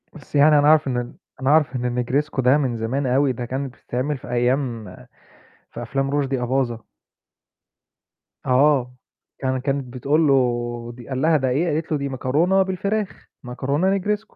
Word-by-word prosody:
بس 150 -2 -12
يعني 145 +1 +6
أنا 145 - +3
أعرف 155 -1 +5
إن 125 -2 -1
ال 120 0 -4 0.3
أنا 130 - +1
أعرف 150 -2 +3
إن 125 -1 -2
الnegresco 140 +3 -1
ده 130 +3 +4
من 130 -5 -1
زمان 125 +5 -2
أوي 135 +2 +2
ده 120 0 -5
كانت 130 +1 -4
بتتعمل 130 +4 -3
في - - -13
أيام 120 -2 0 0.9
في - - -7
أفلام 135 +3 -2
رُشدي 135 -3 -1
أباظة. 125 -2 -1 1.6
آه. 130 -1 +2 0.4
كان 130 -1 -1
كانت 135 -2 -3
بتقول 145 +5 +1
له 140 - +4 0.6
دي 120 0 -13
قال 130 -1 -2
لها: 160 +1 +4
"ده 130 -2 0
إيه" 145 +8 +1
قالت 160 +2 -3
له: 155 - +2
"دي 140 0 -3
مكرونة 150 +9 +1
بالفراخ، 200 +2 -3 0.2
مكرونة 140 +10 0
negresco." 210 +3 -3
135 Hz, 165 wpm, -22 LUFS, 125-150 Hz, 1.6 s, يعني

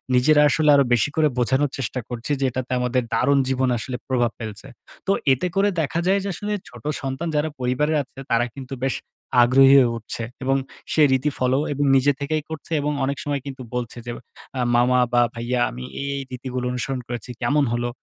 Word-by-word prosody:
নিজেরা 150 +4 +5
আসলে 155 0 +2
আরো 140 - +5
বেশি 120 +4 +3
করে 155 -1 +4
বোঝানোর 130 +3 +2
চেষ্টা 130 0 -3
করছি, 120 +4 -4
যে, 135 - +1
এটাতে 130 0 -5
আমাদের 125 +1 +1
দারুণ 140 +4 +3
জীবন 130 -1 +1
আসলে 125 +2 -4
প্রভাব 120 -3 +1
ফেলছে। 110 +2 -7 0.4
তো - - +3 0.2
এতে 160 +8 -1
করে 200 +1 +3
দেখা 160 +3 -1
যায়, 195 +1 +3
যে, - - -3
আসলে 210 +4 -4 0.2
ছোট 120 -2 -14 0.2
সন্তান 135 +5 -3
যারা 150 +1 +1
পরিবারে 130 +5 0
আছে, 135 - -29
তারা 115 +1 +3
কিন্তু 135 0 -7
বেশ 135 - 0 0.5
আগ্রহী 135 +2 +6
হয়ে 125 -3 +3
উঠছে, 115 +1 -5 0.2
এবং 135 +1 +2 0.4
সে 155 - +3
রীতি 130 +3 +2
ফলো 130 +2 +2
এবং 145 +1 -1
নিজে 140 +2 +4
থেকেই 150 +1 -1
করছে 160 +1 -8
এবং 150 - 0
অনেক 140 +1 -2
সময় 145 -1 -2
কিন্তু 135 -1 -7
বলছে 120 -1 -4
যে, 120 - -4 0.5
আ - - -1 0.2
মামা 125 +1 +4
বা 120 - +5
ভাইয়া 120 +1 -2
আমি 125 +1 -8 0.2
এই, 140 - -3
এই - - -3
রীতিগুলো 125 0 -4
অনুসরণ 125 +1 -2
করেছি 120 0 -6
কেমন 145 0 +2
হলো? 120 0 -1
130 Hz, 200 wpm, -23 LUFS, 125-145 Hz, 0.5 s, আগ্রহী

